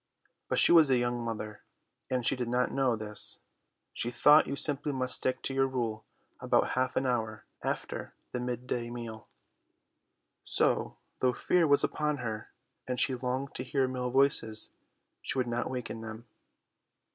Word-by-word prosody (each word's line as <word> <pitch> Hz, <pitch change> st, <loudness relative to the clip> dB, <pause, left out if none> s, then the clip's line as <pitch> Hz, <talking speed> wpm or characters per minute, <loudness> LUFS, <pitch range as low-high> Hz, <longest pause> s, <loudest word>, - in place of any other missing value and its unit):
But -, -, 0 dB
she -, -, +7 dB
was 160 Hz, -4 st, +7 dB
a 130 Hz, -, +4 dB
young 120 Hz, 0 st, -1 dB
mother 110 Hz, -2 st, -5 dB, 0.5 s
and 125 Hz, -2 st, -1 dB
she -, -, +6 dB
did 125 Hz, -2 st, -3 dB
not 125 Hz, +1 st, 0 dB
know 135 Hz, -3 st, +1 dB
this; 105 Hz, -1 st, +2 dB, 0.5 s
she 120 Hz, -, -1 dB
thought 145 Hz, +5 st, +5 dB
you 140 Hz, -, -3 dB
simply 145 Hz, 0 st, +3 dB
must 130 Hz, -2 st, 0 dB
stick 130 Hz, -, +1 dB
to 135 Hz, -, 0 dB
your 135 Hz, 0 st, +2 dB
rule 115 Hz, -5 st, -3 dB, 0.3 s
about -, -, +2 dB
half 130 Hz, 0 st, -1 dB
an 135 Hz, -, 0 dB
hour 110 Hz, -4 st, -2 dB, 0.2 s
after -, -, -4 dB, 0.2 s
the 125 Hz, -, -3 dB
mid 125 Hz, 0 st, -4 dB
day 120 Hz, -1 st, -3 dB
meal. 115 Hz, -2 st, -8 dB, 1.2 s
So, -, -, 0 dB, 0.2 s
though 125 Hz, -1 st, +2 dB
fear 170 Hz, +5 st, +2 dB
was 145 Hz, -1 st, +4 dB
upon 150 Hz, -1 st, -1 dB
her, 110 Hz, -4 st, -5 dB, 0.4 s
and 125 Hz, -1 st, -2 dB
she 135 Hz, -, +3 dB
longed 130 Hz, +2 st, -3 dB
to -, -, -3 dB
hear 135 Hz, -3 st, 0 dB
male 125 Hz, -1 st, -3 dB
voices, 125 Hz, -5 st, +2 dB, 0.5 s
she -, -, -2 dB
would 130 Hz, -, +1 dB
not 120 Hz, +1 st, -2 dB
waken 120 Hz, -3 st, -5 dB
them. 110 Hz, +1 st, -8 dB
125 Hz, 170 wpm, -30 LUFS, 115-135 Hz, 1.2 s, she